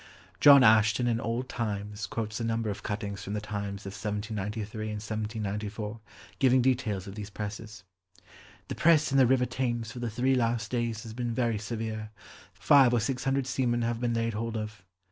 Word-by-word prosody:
John 140 -2 +9
Ashton 110 +2 +5
in 115 -1 +1
Old 120 +3 -2
Times 105 -3 -4
quotes 115 -4 -4
a - - -2
number 115 -1 -1
of 105 +1 -7
cuttings 100 -2 -4
from 100 - -5
The 105 - -1
Times 100 -1 -5
of 95 - -6
1793 105 +1 -4
and 105 - -4
1794 105 0 -4 0.4
giving 130 -1 +4
details 120 -7 0
of 95 - -8
these 105 0 -7
presses. 105 -1 -7 0.9
"The - - -2
press 155 -3 +4
in 135 - +4
the 130 - +6
river 130 0 +3
Thames 120 -3 -2
for 120 - -8
the 120 -1 -2
three 125 +4 +1
last 115 -3 0
days 115 -3 -1
has 110 - -8
been 120 -1 -3
very 115 -4 0
severe. 110 -1 -4 0.4
Five 135 -4 +5
or - - +3
six 125 +3 -2
hundred 135 0 +1
seamen 125 -2 0
have 115 0 -1
been 120 -1 0
laid 115 0 0
hold 115 +1 -3
of." 105 -2 -6
115 Hz, 185 wpm, -29 LUFS, 105-120 Hz, 0.9 s, John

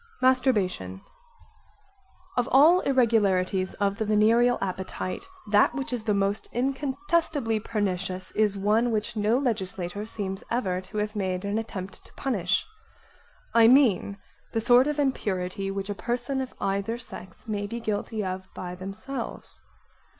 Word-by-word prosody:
Masturbation 210 - +1 1.4
Of 245 -1 +1
all 310 +7 +7
irregularities 200 - +2
of 200 -1 0
the 220 - -1
venereal 225 +4 +4
appetite, 190 - -4 0.2
that 205 0 +5
which 270 -2 -3
is 240 -3 -2
the 210 -2 +2
most 200 +1 -1
incontestably 275 - 0
pernicious 190 -4 -2
is 210 -2 +2
one 215 +5 +2
which 220 +1 -1
no 215 +3 +2
legislator 205 -5 -2
seems 195 -3 -4
ever 190 -7 0
to 190 +3 -8
have 210 +1 -1
made 190 -1 -2
an 205 +2 0
attempt 195 -4 -6
to - - -17
punish. 200 -10 0 0.9
I 230 -1 +7
mean 230 -6 +4 0.4
the 225 - +1
sort 245 +4 +5
of 300 0 -1
impurity 195 -9 -1
which 195 +1 -3
a - - 0
person 245 +5 -2
of 260 - -6
either 200 +4 -1
sex 230 -2 -10
may 205 -2 -2
be 235 +3 -5
guilty 215 -1 -2
of 185 0 -5
by 180 -1 -5
themselves. 195 +9 -7
215 Hz, 140 wpm, -27 LUFS, 195-245 Hz, 1.4 s, all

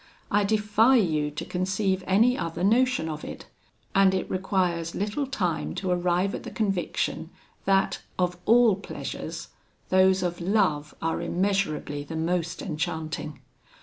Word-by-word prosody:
I 205 0 +3
defy 215 +4 +3
you 155 -10 +2
to 150 - -6
conceive 190 +1 -1
any 225 +7 +4
other 170 -7 -3
notion 245 -2 +3
of 155 -1 -5
it; - - -8 0.5
and 195 -1 +5
it 185 - -2
requires 180 -3 0
little 210 +8 -2
time 185 -11 -2
to 190 -2 -2
arrive 180 +2 +1
at - - -4
the - - -7
conviction, 195 -5 -2 0.4
that, 195 0 +2 0.2
of 180 -1 +1
all 230 -2 +6
pleasures, 200 - -6 0.4
those 185 0 +4
of 175 0 -2
love 170 -6 +1
are 165 +1 0
immeasurably 175 -5 -1
the 160 +3 -7
most 170 +1 -1
enchanting. 155 -4 -4
185 Hz, 140 wpm, -26 LUFS, 170-205 Hz, 0.5 s, all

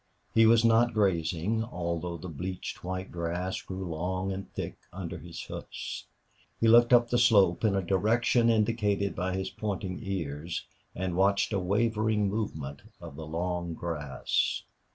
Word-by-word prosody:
He 115 0 +6
was 115 0 +5
not 115 +1 +4
grazing, 95 +2 +1
although 85 -5 -3
the 90 - -8
bleached 90 +3 -5
white 95 +1 -4
grass 90 +2 -2
grew 95 0 -6
long 95 +4 -2
and 95 0 -6
thick - - -5
under 90 -2 -6
his 85 -2 -8
hoofs. - - -7 0.5
He 115 - +3
looked 120 +2 +7
up 120 -1 +5
the 120 - +3
slope, 100 -7 +5
in 105 -3 +3
a 95 - 0
direction 115 +6 +3
indicated 105 -3 +1
by 95 +1 -1
his 95 0 -3
pointing 100 -3 -3
ears, 85 -5 -4 0.3
and 90 -1 -2
watched 100 +3 +2
a 100 - +2
wavering 105 +2 +1
movement 80 -10 -4 0.2
of - - -9
the 80 +1 -7
long 85 +1 -2
grass. 75 -5 -1
95 Hz, 155 wpm, -29 LUFS, 85-110 Hz, 0.5 s, looked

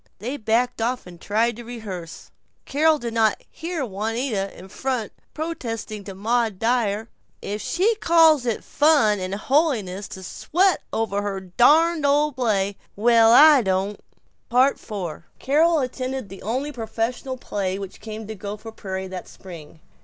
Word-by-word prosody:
They 245 +8 -4
backed 235 0 0
off 245 +2 -1
and 175 -2 -13
tried 225 +2 0
to 240 - -8
rehearse. 205 -8 -8 0.3
Carol 310 +3 +3
did 235 -4 -5
not 220 -2 +2
hear 330 -4 -4
Juanita, 215 0 -2
in 185 - -11
front, 250 +2 -3 0.2
protesting 230 -10 -5
to 195 - -8
Maud 225 0 0
Dyer, 225 -1 0 0.3
"If 210 +1 -5
she 390 +7 +1
calls 320 - +5
it 230 - -1
fun 285 -9 +3
and 185 +1 -3
holiness 215 - 0
to 190 - -9
sweat 365 - +1
over 210 -2 -1
her 200 -1 -3
darned 300 - +3
old 295 +1 +3
play 200 -6 0 0.2
well, 230 +1 +5
I 290 +2 +8
don't!" 195 0 -1 0.5
IV 255 -1 +2 0.5
Carol 315 +4 +3
attended 255 -2 -4
the 195 - -10
only 260 +7 -2
professional 240 +2 -3
play 195 -5 -3
which 195 -1 -8
came 220 0 -7
to 220 - -6
Gopher 210 +2 -7
Prairie 190 -3 -5
that 185 -1 -7
spring. 165 -4 -12
225 Hz, 145 wpm, -23 LUFS, 200-270 Hz, 0.5 s, I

